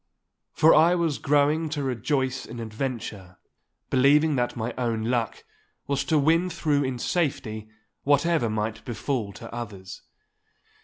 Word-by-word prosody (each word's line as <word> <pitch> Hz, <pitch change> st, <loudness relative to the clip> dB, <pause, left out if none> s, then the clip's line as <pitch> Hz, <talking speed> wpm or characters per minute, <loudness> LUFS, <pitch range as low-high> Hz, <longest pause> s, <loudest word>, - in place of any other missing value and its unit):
For 160 Hz, -, +5 dB
I 165 Hz, +3 st, +5 dB
was 165 Hz, -5 st, 0 dB
growing 150 Hz, +3 st, +2 dB
to 145 Hz, -2 st, -3 dB
rejoice 130 Hz, +1 st, -1 dB
in 115 Hz, +1 st, -8 dB
adventure, 110 Hz, -5 st, -5 dB, 0.5 s
believing 145 Hz, +4 st, +4 dB
that 120 Hz, -1 st, -1 dB
my 115 Hz, +1 st, -3 dB
own 115 Hz, -3 st, -1 dB
luck 115 Hz, -1 st, -1 dB, 0.4 s
was 140 Hz, 0 st, -1 dB
to 160 Hz, -, +2 dB
win 165 Hz, +5 st, +3 dB
through 150 Hz, -4 st, 0 dB
in 130 Hz, -2 st, -2 dB
safety 115 Hz, -8 st, -2 dB, 0.3 s
whatever 145 Hz, -2 st, +2 dB
might 110 Hz, +1 st, -3 dB
befall 120 Hz, -2 st, -3 dB
to 115 Hz, +4 st, -10 dB
others. 100 Hz, -6 st, -7 dB
130 Hz, 135 wpm, -25 LUFS, 115-150 Hz, 0.5 s, For